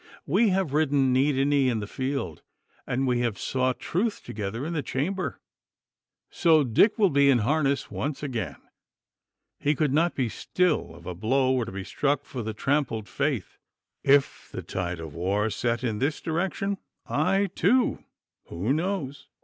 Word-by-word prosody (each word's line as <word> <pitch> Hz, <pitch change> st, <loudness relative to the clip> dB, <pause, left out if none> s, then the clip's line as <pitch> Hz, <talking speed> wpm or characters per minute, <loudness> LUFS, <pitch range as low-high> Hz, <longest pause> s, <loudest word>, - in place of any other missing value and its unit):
We 205 Hz, +9 st, +3 dB
have 185 Hz, -6 st, 0 dB
ridden 140 Hz, -4 st, +3 dB
knee 135 Hz, +3 st, +3 dB
to 135 Hz, 0 st, +1 dB
knee 140 Hz, -2 st, +3 dB
in 115 Hz, -3 st, 0 dB
the 105 Hz, -, -4 dB
field, 130 Hz, -, -3 dB, 0.5 s
and 130 Hz, +2 st, 0 dB
we 125 Hz, -2 st, +1 dB
have 120 Hz, -4 st, -1 dB
sought 130 Hz, +2 st, 0 dB
truth 210 Hz, +5 st, -1 dB
together 110 Hz, +5 st, -4 dB
in 170 Hz, -, -3 dB
the 155 Hz, -, 0 dB
chamber. 180 Hz, +9 st, -2 dB, 0.9 s
So, 160 Hz, -3 st, +4 dB
Dick 135 Hz, -, +4 dB
will 205 Hz, -4 st, +4 dB
be 140 Hz, 0 st, +5 dB
in 135 Hz, -, +5 dB
harness 140 Hz, +4 st, +1 dB
once 145 Hz, +1 st, -3 dB
again! 125 Hz, -6 st, -3 dB, 1.0 s
He 145 Hz, +1 st, +1 dB
could 145 Hz, -1 st, +1 dB
not 165 Hz, +3 st, +2 dB
be 130 Hz, -3 st, 0 dB
still 180 Hz, +8 st, 0 dB
if -, -, -15 dB
a 90 Hz, -, -4 dB
blow 130 Hz, +8 st, +1 dB
were 125 Hz, -3 st, +1 dB
to 115 Hz, -, -7 dB
be 100 Hz, 0 st, -5 dB
struck 145 Hz, +6 st, 0 dB
for 125 Hz, -, -5 dB
the 110 Hz, -1 st, -4 dB
trampled 125 Hz, -5 st, 0 dB
faith. 140 Hz, -, -2 dB, 0.4 s
If 140 Hz, 0 st, +3 dB
the -, -, -6 dB
tide 90 Hz, -2 st, -3 dB
of 80 Hz, -3 st, -7 dB
war 100 Hz, +6 st, 0 dB
set 120 Hz, +1 st, -1 dB
in 110 Hz, -4 st, -1 dB
this 145 Hz, +3 st, 0 dB
direction, 190 Hz, +4 st, -2 dB, 0.3 s
I 195 Hz, 0 st, +1 dB
too 240 Hz, +7 st, +2 dB, 0.4 s
who 95 Hz, +10 st, -1 dB
knows? 160 Hz, -4 st, -3 dB
135 Hz, 170 wpm, -26 LUFS, 115-155 Hz, 1.0 s, be